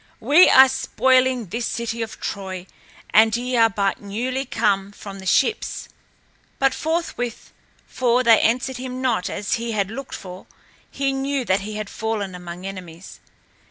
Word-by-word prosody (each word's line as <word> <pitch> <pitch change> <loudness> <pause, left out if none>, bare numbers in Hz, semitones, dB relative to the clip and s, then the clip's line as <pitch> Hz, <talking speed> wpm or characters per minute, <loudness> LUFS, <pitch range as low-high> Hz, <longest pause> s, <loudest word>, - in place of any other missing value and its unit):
We 295 +10 +6
are 265 0 +8
spoiling 260 -1 +2
this 235 +4 -2
city 235 0 -3
of 225 -1 -6
Troy 190 -2 -5 0.5
and 220 +1 +6
ye 250 +1 -3
are 225 -1 +5
but 195 -1 -1
newly 250 +7 -3
come 200 -4 0
from 200 -1 -10
the 190 - -8
ships." 270 - 0 0.7
But 270 -1 +2
forthwith, 315 -7 -3 0.3
for 250 0 +1
they 230 -3 +6
answered 255 +3 +1
him 255 0 -6
not 235 -8 0
as 205 - -3
he 230 -1 -3
had 200 -1 -1
looked 270 +3 -7
for, 185 0 -10 0.4
he 275 0 -1
knew 270 -1 -2
that 190 -1 +2
he 210 +2 -6
had 215 -1 -4
fallen 220 -3 -3
among 180 0 -8
enemies. 185 -3 -9
230 Hz, 160 wpm, -22 LUFS, 195-255 Hz, 0.7 s, are